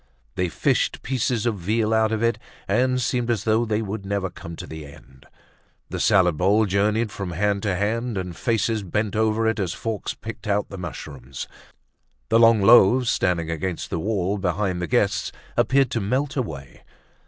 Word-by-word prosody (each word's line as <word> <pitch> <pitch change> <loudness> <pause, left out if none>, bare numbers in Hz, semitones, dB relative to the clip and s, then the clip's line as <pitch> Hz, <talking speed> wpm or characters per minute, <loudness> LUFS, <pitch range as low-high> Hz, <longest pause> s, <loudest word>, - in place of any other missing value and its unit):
They 90 -1 -1
fished 75 - 0
pieces 125 -3 -1
of 110 -4 0
veal 110 +5 0
out 110 0 +3
of 110 0 -1
it 115 0 +1 0.3
and 125 +5 +2
seemed 120 0 -1
as 110 -4 0
though 110 +2 +2
they 110 0 -1
would 100 0 -5
never 100 -2 -2
come 85 -1 -9
to - - -7
the 80 -1 -8
end; 65 -2 -15 0.6
the - - -3
salad 90 -5 +3
bowl 100 +6 +3
journeyed 105 +3 +1
from 95 -4 -5
hand 100 +3 0
to 100 -3 0
hand 110 +3 -1
and 90 -2 -4
faces 115 +1 0
bent 105 +3 -2
over 110 +1 +1
it 110 -1 0
as 95 -4 -1
forks 110 -2 -4
picked 110 -1 -8
out 105 0 0
the 100 - -8
mushrooms. 70 -7 -7 0.8
The 115 - +4
long 115 -3 +6
loaves 120 +3 +6
standing 85 -3 0
against 85 +2 -4
the 85 - -1
wall 100 +1 -1
behind 90 0 -1
the 90 - -2
guests - - +1 0.2
appeared 130 +2 +3
to 115 - -1
melt 130 +8 -1
away. 75 - -5
105 Hz, 180 wpm, -23 LUFS, 90-115 Hz, 0.8 s, long